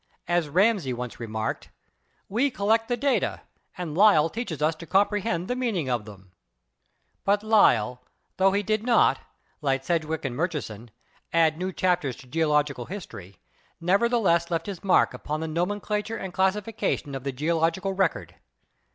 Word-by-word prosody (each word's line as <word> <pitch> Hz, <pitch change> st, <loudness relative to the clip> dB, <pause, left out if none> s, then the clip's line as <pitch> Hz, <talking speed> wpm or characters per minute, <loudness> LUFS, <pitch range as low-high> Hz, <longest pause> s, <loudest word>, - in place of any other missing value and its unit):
As 175 Hz, -3 st, +1 dB
Ramsay 185 Hz, -, +2 dB
once 125 Hz, 0 st, -6 dB
remarked, 110 Hz, -1 st, -4 dB, 0.6 s
"We 240 Hz, +8 st, +1 dB
collect 225 Hz, 0 st, +1 dB
the 245 Hz, -, -1 dB
data 275 Hz, +2 st, 0 dB, 0.4 s
and 170 Hz, -4 st, -5 dB
Lyell 175 Hz, -5 st, +5 dB
teaches 225 Hz, -, -4 dB
us 155 Hz, +2 st, +2 dB
to 170 Hz, -, -10 dB
comprehend 195 Hz, -1 st, +1 dB
the 250 Hz, -, -1 dB
meaning 220 Hz, -, -1 dB
of 120 Hz, -4 st, -1 dB
them." 95 Hz, -3 st, -13 dB, 0.9 s
But 205 Hz, +1 st, +2 dB
Lyell, 125 Hz, -, +3 dB, 0.4 s
tho 190 Hz, 0 st, +4 dB
he 200 Hz, +1 st, 0 dB
did 215 Hz, +1 st, 0 dB
not, 235 Hz, +1 st, +3 dB, 0.4 s
like 135 Hz, -2 st, 0 dB
Sedgwick 160 Hz, -1 st, -1 dB
and 125 Hz, -3 st, -3 dB
Murchison, 140 Hz, -, -3 dB, 0.4 s
add 165 Hz, -1 st, +3 dB
new 185 Hz, +1 st, -2 dB
chapters 175 Hz, -8 st, 0 dB
to -, -, -14 dB
geological 150 Hz, -2 st, 0 dB
history, 100 Hz, -, -9 dB, 0.4 s
nevertheless 190 Hz, -2 st, +2 dB
left 165 Hz, -1 st, -1 dB
his 195 Hz, -4 st, -7 dB
mark 190 Hz, -, +3 dB
upon 150 Hz, +1 st, -4 dB
the 160 Hz, -, -3 dB
nomenclature 205 Hz, +6 st, -2 dB
and 190 Hz, -2 st, -6 dB
classification 190 Hz, -6 st, -1 dB
of 135 Hz, -1 st, -5 dB
the 140 Hz, -, -2 dB
geological 165 Hz, +7 st, 0 dB
record. 190 Hz, -3 st, -1 dB
170 Hz, 150 wpm, -26 LUFS, 145-205 Hz, 0.9 s, Lyell